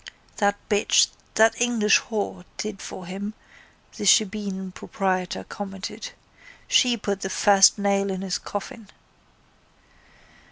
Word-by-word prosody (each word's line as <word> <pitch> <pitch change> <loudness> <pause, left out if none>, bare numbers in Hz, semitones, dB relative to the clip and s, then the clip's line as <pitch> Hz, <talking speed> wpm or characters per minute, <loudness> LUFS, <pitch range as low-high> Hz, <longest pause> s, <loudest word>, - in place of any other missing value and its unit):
—That 205 0 +2
bitch, 205 0 +4 0.3
that 225 +2 +4
English 230 -4 +4
whore, 200 -4 -4
did 210 -2 -5
for 185 - -8
him, 200 +4 -6 0.6
the - - -5
shebeen 200 -2 +2
proprietor 185 -1 -2
commented. 200 +1 -7 0.6
She 245 -2 +4
put 200 -2 -3
the 190 - -3
first 195 +1 +5
nail 200 -1 +1
in 190 0 -4
his 185 -2 -2
coffin. 205 +1 -7
200 Hz, 115 wpm, -24 LUFS, 190-210 Hz, 0.6 s, first